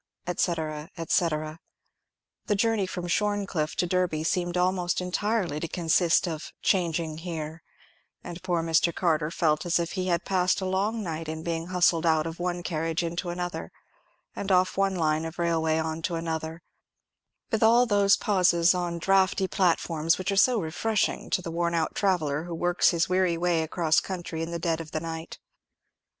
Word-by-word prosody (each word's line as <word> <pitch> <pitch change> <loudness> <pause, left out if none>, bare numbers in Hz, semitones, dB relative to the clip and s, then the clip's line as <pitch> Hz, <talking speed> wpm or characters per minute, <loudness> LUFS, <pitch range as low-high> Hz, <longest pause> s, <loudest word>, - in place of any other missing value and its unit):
&c., 180 - 0
&c. 165 0 -1
The 155 0 -4 1.0
journey 220 -2 +1
from 180 -1 -5
Shorncliffe 200 -5 -1
to - - +1
Derby 175 -3 0
seemed 175 +1 -1
almost 180 -1 +1
entirely 180 -3 -1
to 165 - -3
consist 170 +2 +2
of 160 -2 -5
"changing 165 -4 0
here;" 160 -2 -6 0.6
and 175 0 -8
poor 175 -3 -1
Mr. 165 +1 +2
Carter 155 -4 +1
felt 155 -3 +1
as 175 -2 +1
if 170 -1 -2
he 185 0 -2
had 170 -2 0
passed 185 -1 +1
a 190 - -3
long 205 +4 -1
night 165 -3 -4
in 160 0 -5
being 165 0 -3
hustled 175 -2 +2
out 160 -1 +3
of 165 +1 -6
one 175 0 -2
carriage 165 -1 -1
into 170 +2 -3
another, 175 - -4 0.6
and 200 - -3
off 185 0 +3
one 195 -1 +1
line 155 -2 +1
of 165 0 -6
railway 165 -2 +1
on 160 0 -2
to 170 +1 -2
another, 165 0 -4 0.9
with 220 - 0
all 235 +2 +6
those 200 -3 +4
pauses 180 -4 +3
on 175 -1 -2
draughty 190 +1 +2
platforms 165 -4 +1
which 185 +1 -2
are - - 0
so 235 +4 +4
refreshing 200 +5 -1
to 180 - 0
the 165 - -5
worn 170 0 0
out 160 -1 0
traveller 160 -6 0
who 175 -1 -5
works 175 +1 +2
his 170 -1 +1
weary 185 -2 +1
way 170 -1 +1
across 160 0 +2
country 175 -3 -5
in 165 - -3
the 170 - -3
dead 165 -1 -1
of 160 - -9
the 155 - 0
night. 165 0 -6
170 Hz, 175 wpm, -27 LUFS, 160-185 Hz, 1.0 s, all